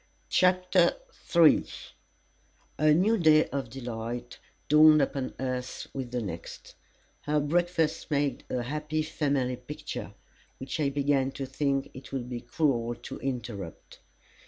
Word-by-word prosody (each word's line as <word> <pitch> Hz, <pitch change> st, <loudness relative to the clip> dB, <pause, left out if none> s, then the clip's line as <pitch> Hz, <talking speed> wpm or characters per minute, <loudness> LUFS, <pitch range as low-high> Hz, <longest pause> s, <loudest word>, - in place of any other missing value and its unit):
CHAPTER 180 Hz, -1 st, +3 dB, 0.4 s
III 165 Hz, -2 st, +6 dB, 1.1 s
A 155 Hz, 0 st, +5 dB
new 200 Hz, +8 st, +3 dB
day 155 Hz, -2 st, +6 dB
of 135 Hz, -4 st, -3 dB
delight 120 Hz, -1 st, -6 dB, 0.3 s
dawned 155 Hz, +1 st, +7 dB
upon 135 Hz, -1 st, -1 dB
us 130 Hz, -1 st, -4 dB
with 130 Hz, -3 st, -4 dB
the 125 Hz, -1 st, -2 dB
next. 85 Hz, -5 st, -8 dB, 0.5 s
Our 150 Hz, 0 st, +2 dB
breakfast 165 Hz, +1 st, 0 dB
made 145 Hz, -2 st, 0 dB
a 125 Hz, -, -1 dB
happy 150 Hz, +4 st, -2 dB
family 140 Hz, -5 st, -1 dB
picture, 125 Hz, +5 st, -7 dB, 0.4 s
which 130 Hz, +4 st, -5 dB
I 145 Hz, -2 st, +2 dB
began 140 Hz, -1 st, +1 dB
to 135 Hz, -, -4 dB
think 135 Hz, 0 st, -1 dB
it 130 Hz, -, -11 dB
would 125 Hz, -3 st, -4 dB
be 120 Hz, -1 st, -4 dB
cruel 120 Hz, -2 st, 0 dB
to 120 Hz, -, -9 dB
interrupt. 120 Hz, -, -6 dB
140 Hz, 130 wpm, -28 LUFS, 125-155 Hz, 1.1 s, dawned